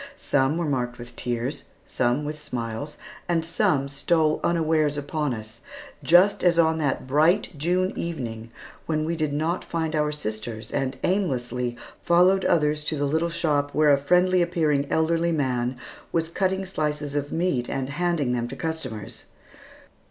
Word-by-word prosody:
Some 135 +3 +1
were 170 - -1
marked 125 -4 -1
with 120 0 -10
tears, 125 +4 -3 0.2
some 125 +4 0
with 150 0 -5
smiles, 120 +4 -5 0.3
and 165 -2 +1
some 145 -4 +1
stole 155 +3 +1
unawares 155 -3 +2
upon 145 0 -2
us, 110 0 -7 0.4
just 175 +8 +5
as 175 -2 +4
on 160 -1 +3
that 140 -4 -1
bright 155 +9 +3
June 180 +5 0
evening, 115 -9 -4 0.4
when 155 -1 0
we 170 +1 -1
did 155 -2 -1
not 160 +5 -1
find 160 -1 -2
our 150 -1 +1
sisters, 110 -4 -5
and 135 0 -1
aimlessly 125 -10 -1 0.2
followed 180 +3 +4
others 150 -2 +2
to 155 - -1
the 145 - 0
little 160 +4 +1
shop 150 -4 0
where 150 -1 +5
a 140 - +3
friendly 180 +4 +3
appearing 155 -5 +1
elderly 165 +1 +2
man 130 -5 0 0.3
was 165 -1 0
cutting 190 +2 0
slices 150 -5 -2
of 145 0 -2
meat 160 -8 0
and 135 0 -2
handing 160 -5 0
them 120 -1 -1
to 130 - -7
customers. 135 -10 -5
150 Hz, 155 wpm, -25 LUFS, 130-170 Hz, 0.4 s, just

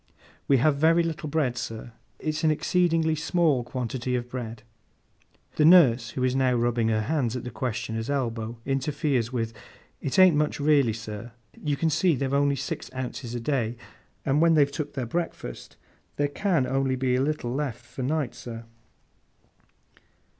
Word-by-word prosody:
'We 140 - +5
have 140 +3 +3
very 165 +3 +4
little 160 -2 -3
bread, 140 -5 0
sir. 115 +1 -6 0.3
It's 155 +1 -3
an 160 - +4
exceedingly 165 0 +2
small 160 -4 +1
quantity 125 0 -3
of 120 0 -3
bread.' 115 -3 -6 0.9
The 150 - +4
nurse, 130 -9 +6
who 130 - 0
is 130 0 +1
now 130 -2 +2
rubbing 120 -1 +1
her 110 -1 +1
hands 130 -1 -1
at 125 - -4
the 125 - -6
questioner's 115 -1 -3
elbow, 115 -4 -2
interferes 135 -3 0
with, 115 -3 -2 0.5
'It 135 - -2
ain't 185 -4 +7
much 150 0 0
raly, 145 -5 +4
sir. 110 +1 -7 0.2
You 150 -1 -2
see 160 +2 +3
they've 135 +1 -2
only 140 0 +3
six 135 0 -5
ounces 125 -1 -5
a - - -2
day, 120 -2 -1 0.5
and 140 +2 +2
when 165 -1 +5
they've 140 -2 +4
took 145 0 -4
their 130 -3 -2
breakfast, 140 - -5 0.4
there 145 0 0
can 170 -2 +1
only 135 0 0
be 130 -1 0
a 125 - +2
little 140 -4 -1
left 130 -4 -3
for 130 - -8
night, 140 0 -1
sir. 115 -1 -8
135 Hz, 165 wpm, -26 LUFS, 120-150 Hz, 0.9 s, ain't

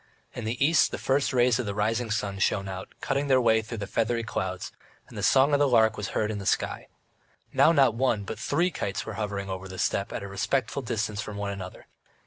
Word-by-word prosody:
In 120 - -6
the 120 +5 +1
east 160 0 +4
the - - -4
first 135 +1 +1
rays 125 -2 +3
of 125 - -2
the 100 - -3
rising 110 +3 0
sun 100 -3 -2
shone 100 0 +1
out, 95 0 -6
cutting 140 +1 -1
their 130 -2 +5
way 110 -2 +3
through 115 +1 -7
the 100 - -4
feathery 115 +4 0
clouds, 95 -4 -4 0.4
and - - -14
the - - -4
song 135 +2 +4
of 145 - +4
the 145 - +4
lark 110 -3 +4
was 105 -2 -4
heard 105 0 +1
in 105 - -4
the 100 - -7
sky. - - -1 0.7
Now 160 - +6
not 135 -7 +4
one 115 -3 +1
but 105 +2 -6
three 170 +9 +1
kites 100 -9 -3
were 110 - -5
hovering 100 -2 -3
over 95 0 -5
the 95 0 -9
steppe 100 +1 0
at - - -4
a - - -5
respectful 110 +7 -1
distance 110 -3 -2
from 105 -2 -7
one 100 0 -2
another. 95 -2 -8
110 Hz, 235 wpm, -27 LUFS, 100-125 Hz, 0.7 s, Now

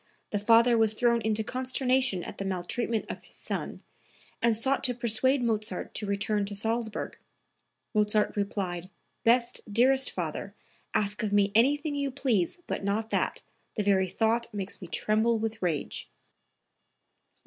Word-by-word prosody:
The 205 - 0
father 230 +2 +5
was 220 -1 +3
thrown 235 0 +3
into 220 0 0
consternation 255 -4 +1
at - - -8
the - - -2
maltreatment 195 +5 -1
of - - -6
his - - -18
son - - -4 0.6
and 235 -1 +3
sought 265 +5 0
to 250 -1 +1
persuade 245 +3 +1
Mozart 220 -1 -2
to 210 - -3
return 200 +1 0
to 205 +1 -5
Salzburg. 225 +1 -2 0.7
Mozart 210 0 +2
replied: 185 -3 -2 0.3
"Best, 235 +1 +3
dearest 260 +5 +4
father, 180 +3 -4 0.4
ask 205 +1 +1
of 215 -2 -1
me 205 -1 +3
anything 290 +7 +3
you 280 -1 -1
please 255 - 0
but - - -3
not 215 +3 -1
that; - - 0 0.3
the 210 - 0
very 195 -2 +3
thought 230 +4 0
makes 200 -2 -5
me 180 - -7
tremble 220 +5 +2
with 225 0 -3
rage.") 165 -6 -2
136. - - -41
220 Hz, 150 wpm, -28 LUFS, 200-240 Hz, 0.7 s, father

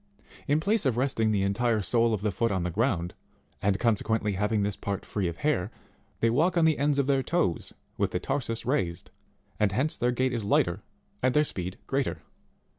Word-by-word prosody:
In 145 +2 +3
place 200 -1 +1
of 120 -3 0
resting 125 -4 +1
the 100 -2 +1
entire 110 +2 +1
sole 115 +2 +3
of 105 -3 -1
the 105 0 0
foot 115 +4 0
on 95 -3 0
the 90 - -2
ground 95 -4 0 0.5
and 100 0 +2
consequently 110 -1 +1
having 105 +2 0
this 100 0 -1
part 100 -1 -4
free 100 -4 -2
of 85 - -4
hair, 140 -10 0 0.5
they 115 - +4
walk 165 +8 +2
on 165 - +4
the 160 -1 +3
ends 145 0 +2
of 140 - +2
their 135 -1 +2
toes 130 - -1 0.3
with - - +2
the 90 - -2
tarsus 120 -1 -3
raised, 95 -11 -1 0.5
and 105 -2 +3
hence 135 +8 0
their 120 - +1
gait 130 +1 0
is 115 -3 -2
lighter, 100 -1 +1 0.4
and 130 +1 +2
their 150 - +5
speed 90 -9 -4
greater. 135 -11 -1
115 Hz, 200 wpm, -28 LUFS, 100-135 Hz, 0.5 s, their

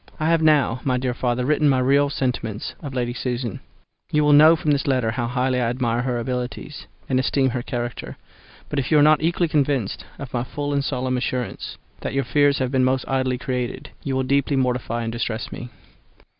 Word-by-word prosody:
I 155 +1 +1
have 165 -1 +3
now, 145 -6 +3
my 130 -2 +1
dear 125 -1 -1
father, 125 0 -1
written 150 +1 +3
my 135 - +3
real 140 +3 +3
sentiments 125 -6 -3
of 140 -4 -7
Lady 120 -1 -1
Susan; 125 -4 -3 0.5
you 150 0 +3
will 150 0 +5
know 155 +3 +8
from 155 -2 0
this 140 -1 0
letter 130 -5 +1
how 120 +1 -2
highly 125 +1 0
I 115 - +1
admire 120 -1 0
her 125 -1 -1
abilities, 125 +4 -4 0.2
and 130 -1 +1
esteem 130 0 +1
her 125 0 -2
character; 120 0 -5 0.5
but 145 - -2
if 135 - -2
you 155 - +4
are 145 - +6
not 155 0 +5
equally 170 +2 +1
convinced 140 -8 0
by 140 - -6
my 120 -1 0
full 145 +2 -4
and 140 0 +1
solemn 130 -1 -1
assurance 125 -1 -3 0.2
that - - -4
your 135 - +2
fears 145 +3 +3
have 130 -1 -1
been 130 -1 +2
most 130 0 +1
idly 130 -1 0
created, 130 +2 -4
you 135 -2 -2
will 130 - +1
deeply 140 +2 +1
mortify 125 -3 0
and 115 - -3
distress 115 -1 -3
me. 120 - -7
130 Hz, 210 wpm, -22 LUFS, 125-145 Hz, 0.5 s, know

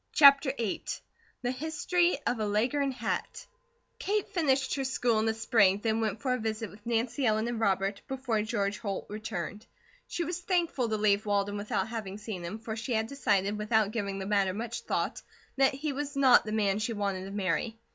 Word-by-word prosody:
CHAPTER 280 -1 +7
VIII 225 -4 -2 0.6
THE 245 - +1
HISTORY 320 +5 +1
OF 245 - 0
A 215 - 0
LEGHORN 250 +7 +1
HAT 260 - -3 0.5
Kate 415 0 0
finished 275 -8 +1
her 275 - -1
school 245 -4 +1
in 220 - +1
the 220 - +2
spring, 220 -4 +4
then 225 0 +1
went 220 0 -2
for 255 -2 +2
a 250 - -1
visit 220 0 -3
with 205 +1 -16
Nancy 235 +3 0
Ellen 220 -1 +2
and 240 -1 -2
Robert, 195 -1 +1
before 260 -5 -1
George 205 -2 -1
Holt 200 -3 -3
returned. 210 -1 -5 0.4
She 345 - -2
was 345 +2 -3
thankful 340 - 0
to 215 - 0
leave 210 0 +2
Walden 205 0 +1
without 205 +1 -1
having 210 -4 -5
seen 210 -4 -6
him, 175 +5 -4
for 220 0 -5
she 235 +2 -3
had 220 0 +1
decided, 210 -6 0
without 210 -1 +2
giving 200 -3 -2
the 190 - -4
matter 200 -2 +1
much 230 +2 -4
thought, - - -2 0.4
that 270 0 +4
he 290 +1 -2
was 285 +1 -4
not 265 -3 +6
the 215 - -4
man 205 -2 +1
she 230 +2 -1
wanted 200 -3 -2
to 195 - -7
marry. 200 +3 -1
220 Hz, 195 wpm, -30 LUFS, 205-260 Hz, 0.6 s, CHAPTER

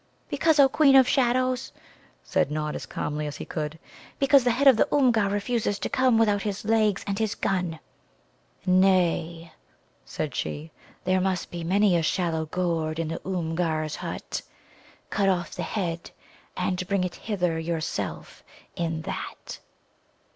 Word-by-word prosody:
"Because, 320 -2 +2
O 275 - +8
Queen 275 0 +4
of 260 -2 +7
Shadows," 255 -1 +1 0.5
said - - +1
Nod 150 0 -2
as - - -6
calmly 150 0 -3
as 145 - -5
he - - -6
could 150 0 -4 0.4
"because 275 -1 +5
the 245 - +2
head 260 +4 +2
of 265 - +9
the - - +3
Oomgar 240 -8 +3
refuses 205 0 -1
to - - -3
come 255 -3 +3
without 210 -3 +3
his 205 0 -4
legs 215 -3 +2
and 200 +1 -2
his 220 -2 0
gun." 180 -4 -1 0.9
"Nay," 175 -3 +2 0.5
said 155 -2 -4
she, 155 +2 -4 0.3
"there 185 0 +2
must 185 -1 -1
be 170 -1 -5
many 195 +2 +3
a 170 - +2
shallow 160 -2 0
gourd 165 -2 -1
in 165 -1 -2
the 165 - -4
Oomgar's 165 -3 -2
hut. - - -5 0.7
Cut 200 -2 +2
off 175 -2 -1
the - - -5
head, 170 -5 -3 0.5
and 185 -1 -1
bring 200 -2 +1
it 180 -1 -3
hither 180 -6 -2
yourself 160 -1 -4 0.3
in 165 -2 -2
that." - - -6
185 Hz, 155 wpm, -26 LUFS, 165-220 Hz, 0.9 s, of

